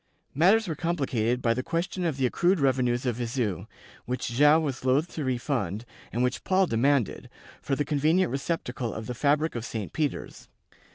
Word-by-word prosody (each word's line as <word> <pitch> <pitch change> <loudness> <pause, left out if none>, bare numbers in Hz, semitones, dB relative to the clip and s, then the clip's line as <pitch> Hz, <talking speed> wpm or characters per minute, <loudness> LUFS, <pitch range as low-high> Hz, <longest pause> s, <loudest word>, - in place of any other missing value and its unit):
Matters 195 +8 +4
were 165 - -1
complicated 135 -8 -1
by 115 - +3
the 130 - -2
question 175 +5 -2
of 160 -5 -1
the 135 - +1
accrued 175 +8 +2
revenues 130 -2 +1
of 120 -3 0
Viseu, 115 -5 -2 0.4
which 125 0 -3
Joao 145 +6 +5
was 140 -6 -3
loath 135 +6 +1
to 155 - -3
refund, 120 - -2 0.3
and 120 +3 0
which 125 +1 -1
Paul 190 0 +3
demanded, 130 - +1 0.3
for 135 - -1
the 145 - -1
convenient 155 +3 +2
receptacle 130 -4 -3
of 110 - -5
the 125 - -4
fabric 145 +5 +1
of 120 - -4
St. 110 -3 -5
Peter's. 150 -3 -3
135 Hz, 175 wpm, -27 LUFS, 120-155 Hz, 0.4 s, Joao